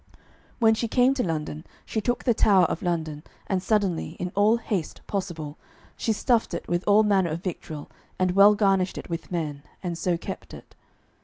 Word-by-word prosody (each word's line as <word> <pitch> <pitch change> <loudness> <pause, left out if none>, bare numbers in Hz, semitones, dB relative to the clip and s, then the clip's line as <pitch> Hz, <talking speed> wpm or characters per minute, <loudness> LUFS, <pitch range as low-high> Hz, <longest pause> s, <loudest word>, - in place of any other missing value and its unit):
When 225 -2 +5
she 230 +1 -1
came 250 +3 +4
to 265 -2 -1
London, 155 -2 -3 0.2
she 220 - -2
took 245 +3 -1
the 240 - +3
Tower 195 -4 +5
of 160 - -2
London, 160 -4 -2 0.2
and 190 -2 -1
suddenly, 195 -6 0
in 180 0 -3
all 210 +3 +4
haste 205 -8 -3
possible, 170 -7 -4 0.4
she 225 - -1
stuffed 230 +1 +1
it - - -6
with 175 +1 0
all 210 +1 +6
manner 195 -4 +2
of 165 +3 -4
victual, 160 -5 -5 0.3
and 185 -1 +2
well 200 +3 +7
garnished 195 -3 +2
it - - -8
with 165 +1 -5
men, 155 -5 -3 0.2
and 175 -2 -2
so 175 -2 +1
kept - - -7
it. - - -14
185 Hz, 185 wpm, -26 LUFS, 165-210 Hz, 0.4 s, well